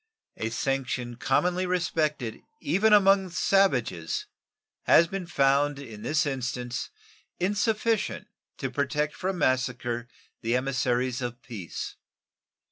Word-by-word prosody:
A 110 - -2
sanction 125 -1 -2
commonly 180 +8 +1
respected 155 -9 -1 0.2
even 215 +5 +2
among 195 -2 +5
savages 135 - +1 0.6
has 170 - +7
been 185 +1 -5
found 140 -2 +2
in 115 -7 -9
this 150 +4 +1
instance 125 -2 -3 0.5
insufficient 215 +4 0 0.3
to - - -3
protect 150 0 0
from 190 0 -2
massacre 125 -4 0 0.3
the 115 +1 +1
emissaries 125 -1 0
of 120 0 -4
peace. 100 - -6
135 Hz, 105 wpm, -27 LUFS, 125-180 Hz, 0.6 s, has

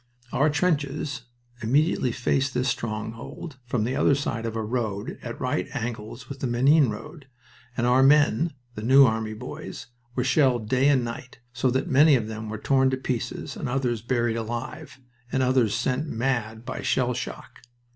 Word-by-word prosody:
Our 150 +3 +3
trenches 145 -4 -1 0.4
immediately 135 +2 +2
faced 130 +2 0
this 125 +1 +1
stronghold 115 +7 -5
from 120 -3 0
the 125 +4 -1
other 140 - +4
side 115 -5 -2
of 115 - -4
a 110 - -1
road 110 -3 -3
at - - -7
right - - -1
angles 115 +1 -5
with 140 -1 -8
the 135 - -1
Menin 135 +3 +4
road, 135 +7 -8 0.5
and 120 - +1
our 125 +2 +4
men 145 +2 +4 0.2
the 105 - -6
New 135 +5 +7
Army 110 -2 -1
boys 125 +2 -8 0.3
were 125 - +1
shelled 130 -4 +2
day 130 +4 +3
and 130 -4 +3
night, 120 +2 -7 0.2
so 125 +1 +1
that 130 +2 0
many 145 +2 +6
of 115 -4 -1
them 110 0 -6
were 110 - -4
torn 135 +3 +3
to 130 - -1
pieces, 130 -3 -4
and - - -4
others 125 -3 -1
buried 120 -1 0
alive, 120 +7 -5 0.3
and 130 - +1
others 125 -4 +2
sent 130 +6 -1
mad 115 -3 -2
by - - -5
shell 125 -1 +1
shock. - - -7
125 Hz, 175 wpm, -25 LUFS, 115-135 Hz, 0.5 s, New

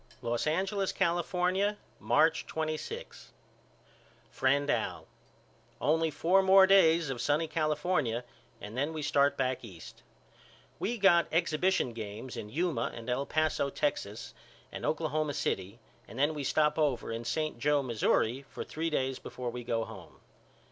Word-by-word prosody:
Los 120 +3 -1
Angeles, 190 +4 0
California, 180 +3 0 0.2
March 140 +10 +2
26 160 - -5 1.0
FRIEND 140 +2 +1
AL: - - -2 0.7
Only 160 +2 +2
four 180 +5 +3
more 190 0 +7
days 170 -6 +5
of 120 -3 -4
sunny 150 +3 +1
California 155 -6 0 0.4
and 105 +2 -8
then 145 +5 -1
we 155 -1 -4
start 145 -1 +2
back 130 -1 -1
East. 95 -8 -11 0.8
We 235 +3 -1
got 175 -5 +5
exhibition 165 -4 +1
games 110 +3 -7
in 105 - -6
Yuma 145 -3 -1
and 115 +1 -5
El 135 +3 -1
Paso, 155 -3 +1
Texas 115 -7 -3 0.4
and - - -4
Oklahoma 155 -2 -1
City 95 +1 -2 0.3
and 115 - -11
then 145 +3 +2
we 145 -2 -4
stop 150 +3 +2
over 140 -7 0
in 115 +1 -4
St. 155 +2 -2
Joe, 145 +2 +2
Missouri, 120 +1 +1
for - - -6
three 165 +2 -3
days 135 -4 -1
before 125 -1 -6
we 125 0 -6
go 115 -1 -1
home. - - -12
150 Hz, 140 wpm, -30 LUFS, 125-165 Hz, 1.0 s, more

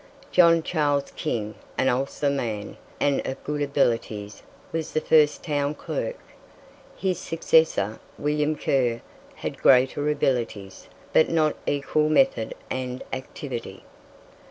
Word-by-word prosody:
John 170 -2 +5
Charles 145 -4 0
King, 110 -8 -3 0.2
an 130 - +2
Ulster 135 +3 0
man, 110 -7 -3 0.2
and 140 -1 +1
of 130 - -5
good 150 0 -3
abilities, 115 -7 -1 0.3
was 165 -1 -3
the 155 - +2
first 150 -1 +3
town 145 -2 -1
clerk. - - -4 0.8
His 185 -2 -1
successor, 160 - +2 0.2
William 150 +1 0
Kerr, 125 -5 0 0.3
had - - -6
greater 135 +3 +4
abilities, 115 -9 -2 0.3
but 160 - +5
not 155 -2 +2
equal 150 +2 +1
method 270 - +2 0.2
and 125 -1 -3
activity. 130 -5 -6
145 Hz, 115 wpm, -25 LUFS, 125-155 Hz, 0.8 s, John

